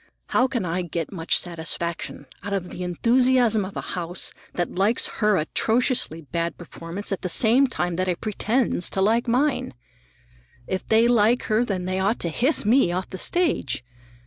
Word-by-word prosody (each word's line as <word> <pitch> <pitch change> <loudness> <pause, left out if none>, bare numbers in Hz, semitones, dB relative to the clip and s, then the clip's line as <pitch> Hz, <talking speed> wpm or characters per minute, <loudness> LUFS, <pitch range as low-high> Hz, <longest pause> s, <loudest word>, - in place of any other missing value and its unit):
How 255 - +3
can 240 -8 -2
I 175 +2 -1
get 170 -2 -4
much 165 -4 0
satisfaction 170 -2 -4 0.2
out 200 +1 -5
of 185 -2 -3
the 180 - -7
enthusiasm 235 +4 +2
of 190 +1 -7
a - - -2
house 175 0 -3 0.2
that 175 - -2
likes 200 +5 +2
her 210 -2 +3
atrociously 225 - 0
bad 170 +5 -3
performance 175 +4 -6
at 195 - -2
the 185 - -3
same 235 +9 +4
time 175 -8 -2
that 185 0 -1
it 180 -2 -1
pretends 215 -2 0
to - - -2
like 225 +5 +2
mine? 255 - 0 0.9
If 190 +6 -4
they 225 +1 +4
like 240 0 +3
her, 220 +2 +1
then 190 -6 -3
they 185 +1 -1
ought 200 +5 0
to 170 - 0
hiss 255 - +1
me 230 -4 +4
off 180 +1 -3
the 190 - -5
stage. 325 - 0
195 Hz, 175 wpm, -24 LUFS, 175-235 Hz, 0.9 s, same